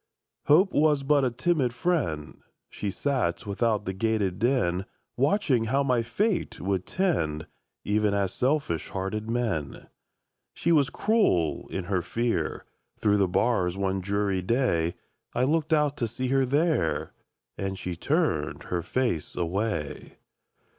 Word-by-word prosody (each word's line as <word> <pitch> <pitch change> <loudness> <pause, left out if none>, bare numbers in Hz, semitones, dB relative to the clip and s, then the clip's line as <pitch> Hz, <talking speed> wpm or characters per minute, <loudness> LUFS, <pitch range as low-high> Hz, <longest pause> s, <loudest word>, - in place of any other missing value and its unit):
Hope 185 +6 +5
Was 150 -2 +3
but 140 0 +3
a 130 - +3
timid 130 -1 0
friend; 90 - -1 0.3
She 105 - -3
sat 110 -3 -1
without 105 +1 0
the 95 - -2
grated 100 -2 0
den, 105 -6 +1 0.3
Watching 135 - +2
how 135 +5 +1
my 125 -3 +2
fate 185 - -1
would 95 -1 -2
tend, 80 - 0 0.4
Even 105 0 +1
as 100 -2 0
selfish 130 - 0
hearted 100 +3 -3
men. 115 - -2 0.7
She 170 - 0
was 145 -4 +4
cruel 200 - +1
in 95 - -3
her 95 0 0
fear; 115 +6 -2 0.3
Through 105 -1 +2
the 100 -2 +3
bars 90 -2 +1
one 95 -1 -1
dreary 100 0 0
day, 90 -6 +1 0.4
I 125 - +2
looked 155 +3 +1
out 150 -2 +2
to 120 - 0
see 125 +3 -3
her 135 0 +3
there, 155 +4 +1 0.4
And 95 0 -3
she 90 -2 -4
turned 140 - 0
her 90 -1 -2
face 120 -5 -1
away! 90 -3 -3
115 Hz, 140 wpm, -27 LUFS, 95-140 Hz, 0.7 s, Hope